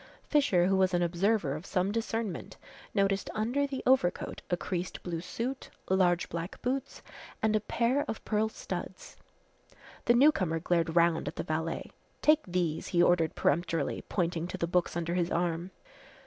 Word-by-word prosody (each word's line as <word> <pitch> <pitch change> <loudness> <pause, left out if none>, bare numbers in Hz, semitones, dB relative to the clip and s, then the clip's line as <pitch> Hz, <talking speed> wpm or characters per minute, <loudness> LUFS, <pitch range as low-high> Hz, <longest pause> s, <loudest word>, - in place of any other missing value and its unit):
Fisher, 205 - +3
who 195 +1 +3
was 190 -1 +3
an 175 - +2
observer 175 -2 +1
of 155 - -6
some 190 0 0
discernment, 225 -2 -3 0.3
noticed 195 -1 +1
under 245 +7 +1
the 270 -1 -5
overcoat 250 -9 +2
a 175 - +1
creased 180 0 -4
blue 170 -2 -3
suit, 235 +9 -4 0.2
large 180 -2 +3
black 170 +2 -5
boots 260 +2 -2 0.4
and 220 0 +3
a - - +4
pair 235 +6 +1
of 220 - -5
pearl 215 0 +1
studs. - - -7 0.9
The 240 - +5
newcomer 220 - +4
glared 165 -1 0
round 170 -3 +3
at 145 - -4
the - - -3
valet. 160 +1 -3 0.3
"Take 305 +1 +5
these!" 175 -3 -1
he 175 -1 +3
ordered 170 -3 +3
peremptorily, 165 -2 0
pointing 170 -2 -1
to - - -5
the - - 0
books 175 0 0
under 170 0 -2
his 175 -1 +1
arm. 170 +1 -1
180 Hz, 160 wpm, -30 LUFS, 170-220 Hz, 0.9 s, The